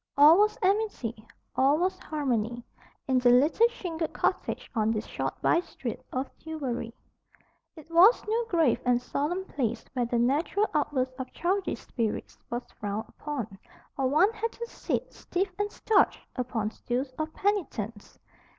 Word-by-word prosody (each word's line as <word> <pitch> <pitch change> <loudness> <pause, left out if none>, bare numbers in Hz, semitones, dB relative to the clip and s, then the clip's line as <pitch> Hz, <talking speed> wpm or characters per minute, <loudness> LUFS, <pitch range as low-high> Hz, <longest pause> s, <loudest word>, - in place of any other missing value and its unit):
All 305 +5 +8
was 425 +1 +3
amity, 370 - 0 0.3
all 275 +3 +4
was 365 +3 0
harmony, 240 -6 -1 0.4
in 260 -1 +3
the 250 -1 +4
little 295 - +5
shingled 340 -9 -4
cottage - - -1
on 220 -2 +1
this 220 -1 -1
short - - -4
by 335 - +4
street 250 -9 -5
of 260 +1 -1
Tillbury. 265 -8 -4 0.8
It 315 0 -14
was 370 +8 +6
no 460 +2 +1
grave 330 - +2
and 245 -1 +3
solemn 305 +9 -2
place 255 - -2
where 245 -3 0
the 240 - 0
natural 290 - +2
outburst 260 -4 0
of 260 -1 -5
childish 375 +3 -1
spirits 225 -4 -3
was 240 +1 -3 0.2
frowned 210 +2 -3
upon, 240 -10 -5 0.4
or 270 -1 +1
one 360 +11 +4
had 455 +1 -2
to 470 - -5
sit - - -3
"stiff 370 +1 -2
and 410 0 0
starched" 430 -3 +2
upon 235 -4 -2
stools 255 +4 -3
of 310 0 -2
penitence. 250 - -2
285 Hz, 150 wpm, -28 LUFS, 240-365 Hz, 0.8 s, All